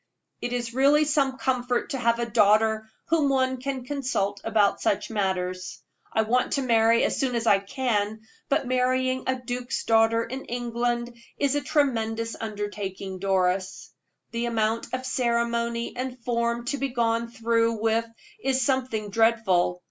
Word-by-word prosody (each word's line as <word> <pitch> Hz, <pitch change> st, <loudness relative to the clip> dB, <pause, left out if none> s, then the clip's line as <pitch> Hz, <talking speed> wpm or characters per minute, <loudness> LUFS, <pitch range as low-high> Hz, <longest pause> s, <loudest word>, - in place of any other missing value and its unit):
"It 240 Hz, -, -3 dB
is 240 Hz, -1 st, -3 dB
really 285 Hz, +4 st, +4 dB
some 280 Hz, -3 st, +1 dB
comfort 250 Hz, -2 st, -1 dB
to 270 Hz, -, -2 dB
have 235 Hz, -1 st, +2 dB
a 235 Hz, -, -1 dB
daughter 220 Hz, 0 st, +3 dB, 0.2 s
whom 315 Hz, -4 st, +3 dB
one 260 Hz, -1 st, +1 dB
can 265 Hz, -2 st, -4 dB
consult 250 Hz, -8 st, -2 dB
about 215 Hz, -2 st, +2 dB
such 205 Hz, -, 0 dB
matters. 185 Hz, -3 st, -2 dB, 0.3 s
I 220 Hz, -, +2 dB
want 245 Hz, +3 st, +1 dB
to 275 Hz, -, 0 dB
marry 230 Hz, -1 st, +4 dB
as -, -, 0 dB
soon 255 Hz, -3 st, 0 dB
as 230 Hz, 0 st, -1 dB
I 200 Hz, -3 st, +5 dB
can; 215 Hz, -1 st, -1 dB, 0.3 s
but 275 Hz, -, +1 dB
marrying 255 Hz, +1 st, +1 dB
a 260 Hz, 0 st, 0 dB
duke's 245 Hz, 0 st, -4 dB
daughter 225 Hz, 0 st, +3 dB
in 260 Hz, +4 st, -6 dB
England 240 Hz, 0 st, -2 dB, 0.2 s
is 280 Hz, -1 st, +1 dB
a 290 Hz, -, +1 dB
tremendous 230 Hz, -6 st, 0 dB
undertaking, 205 Hz, -3 st, -5 dB
Doris. 190 Hz, 0 st, 0 dB, 0.4 s
The 235 Hz, 0 st, -2 dB
amount 225 Hz, -1 st, -1 dB
of 255 Hz, 0 st, -3 dB
ceremony 235 Hz, -1 st, -1 dB
and 255 Hz, 0 st, -4 dB
form 235 Hz, 0 st, 0 dB
to 275 Hz, +3 st, -2 dB
be 275 Hz, +1 st, -1 dB
gone 230 Hz, -1 st, 0 dB
through 230 Hz, 0 st, +1 dB
with 225 Hz, +1 st, 0 dB, 0.4 s
is 265 Hz, -1 st, +2 dB
something 250 Hz, -6 st, -1 dB
dreadful. 215 Hz, -6 st, +2 dB
235 Hz, 155 wpm, -26 LUFS, 220-255 Hz, 0.4 s, I